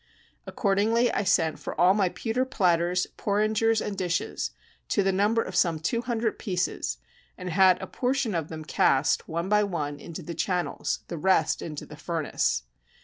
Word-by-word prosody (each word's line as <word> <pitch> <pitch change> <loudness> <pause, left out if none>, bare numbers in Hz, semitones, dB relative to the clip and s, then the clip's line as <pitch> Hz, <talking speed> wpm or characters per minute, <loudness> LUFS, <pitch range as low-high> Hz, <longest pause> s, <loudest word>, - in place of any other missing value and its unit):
Accordingly 225 +4 +2
I - - 0
sent 165 -5 +2
for - - -6
all 180 +2 +6
my 195 -3 +2
pewter 230 +6 -1
platters, 180 -7 +1
porringers, 215 +2 +1
and 205 - -3
dishes, 180 -3 -2 0.4
to 200 - +2
the 195 - +2
number 210 +4 +2
of 185 - -7
some 170 -2 +2
two 230 +9 -1
hundred 230 -2 -2
pieces, 180 - -2 0.4
and 180 -1 -5
had 185 +1 +5
a - - -5
portion 255 -3 -1
of 165 -3 -2
them 155 -1 -7
cast, 135 -1 +2
one 170 +2 -2
by 210 +1 +3
one, 150 -7 -3
into 170 +3 -8
the 170 - -6
channels, 175 +2 -1
the 170 - -5
rest 180 -3 +2
into 150 -3 -6
the 150 - -12
furnace. 160 - -1
185 Hz, 170 wpm, -27 LUFS, 165-210 Hz, 0.4 s, all